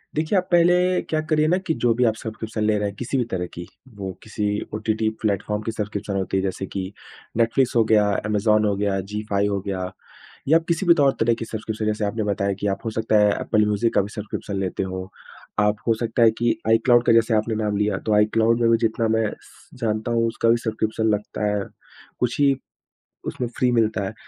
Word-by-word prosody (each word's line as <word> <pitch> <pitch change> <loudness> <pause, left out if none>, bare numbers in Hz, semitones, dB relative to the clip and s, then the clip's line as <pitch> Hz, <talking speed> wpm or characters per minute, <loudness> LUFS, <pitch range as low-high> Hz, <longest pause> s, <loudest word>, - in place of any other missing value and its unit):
देखिए 155 +6 +1
आप 185 - 0
पहले 180 +1 +4
क्या 155 - -2
करिए 155 -1 +3
ना 175 +3 +3
कि 160 - +2
जो 120 -1 +4
भी 125 - +2
आप 110 - -3
सब्सक्रिप्शन 110 -1 -5
ले 105 0 +2
रहे 105 - 0
हैं 100 - -11
किसी 125 +4 -2
भी 125 - +2
तरह 90 -1 -1
की 85 0 -7 0.3
वो 95 -1 -4
किसी 105 -1 -4 0.3
ओटीटी 110 0 0
प्लेटफॉर्म 105 0 -1
की 115 - -2
सब्सक्रिप्शन 105 -2 -4
होती 95 0 -1
है 95 - 0
जैसे 95 0 -3
कि 95 0 -5 0.5
नेटफ्लिक्स 120 +3 +2
हो 115 - +5
गया, 110 -1 +4 0.2
अमेज़न 105 0 +2
हो 100 -1 +1
गया, 100 -1 0
जी5 105 0 -2
हो 100 -1 -1
गया 95 -2 -4 0.6
या 160 +2 +6
किसी 170 +3 0
भी 170 - +7
तौर 140 -3 +4
तरह 115 +1 +3
की 115 - -4
सब्सक्रिप्शन 110 -1 -4
जैसे 105 0 0
आपने 110 +2 -2
बताया 100 -1 0
कि 105 - 0
आप 95 - -9
हो - - 0
सकता 110 -1 +2
है 105 0 +5
एप्पल 105 -1 +2
म्यूज़िक 105 +2 +1
का - - +4
भी 100 - -5
सब्सक्रिप्शन 105 -1 -5
लेते 95 0 -2
हो। 95 0 -5 0.5
आप 105 0 +2
हो 115 - +5
सकता 115 +1 +1
है 115 - +6
कि 120 -1 +2
आईक्लाउड 120 +2 +4
का - - +5
जैसे 115 0 +3
आपने 110 +1 0
नाम 105 -1 0
लिया 105 +1 +1
तो 110 - +3
आईक्लाउड 110 +2 +3
में 115 - +4
भी 115 - +5
जितना 110 +1 -1
मैं 110 -1 +1
स - - -20
जानता 110 +1 -1
हूँ 115 0 +2
उसका 115 0 0
भी 115 - +5
सब्सक्रिप्शन 110 -1 -1
लगता 105 0 -2
है। 100 -1 -1 0.6
कुछ 125 +1 -1
ही 140 -1 +4 0.7
उसमें 125 - -3
फ्री 125 -1 +2
मिलता 110 -3 +1
है। 95 - -5
110 Hz, 220 wpm, -23 LUFS, 105-115 Hz, 0.7 s, भी